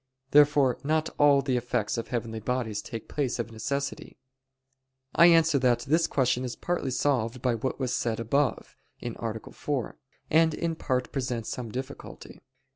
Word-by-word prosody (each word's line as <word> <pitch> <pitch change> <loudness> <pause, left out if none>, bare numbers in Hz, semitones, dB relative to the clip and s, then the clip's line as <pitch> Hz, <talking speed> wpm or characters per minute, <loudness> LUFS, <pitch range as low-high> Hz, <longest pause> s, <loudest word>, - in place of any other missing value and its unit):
Therefore 145 -3 +5
not 155 +2 0
all 145 -1 +5
the 130 -2 +1
effects 120 -3 -1
of 115 - -4
heavenly 115 -2 -3
bodies 110 -2 -2
take 115 -2 -7
place 140 -4 -1
of 115 -1 -4
necessity. 140 +5 -4 1.0
I 170 - +7
answer 165 -4 +5
that, 125 -2 +2
This 160 +5 +2
question 125 -2 +1
is 125 -1 -4
partly 175 -6 -2
solved 125 -2 0
by 125 -2 +2
what 125 +4 -3
was 130 -2 -1
said 115 -2 -1
above 140 +5 0 0.3
(A. 115 -2 -4
4); 140 -5 -3 0.3
and 160 0 +4
in 170 -1 -1
part 130 -5 -2
presents 125 -4 -3
some 120 -3 -5
difficulty. 130 +3 -8
130 Hz, 155 wpm, -27 LUFS, 120-145 Hz, 1.0 s, I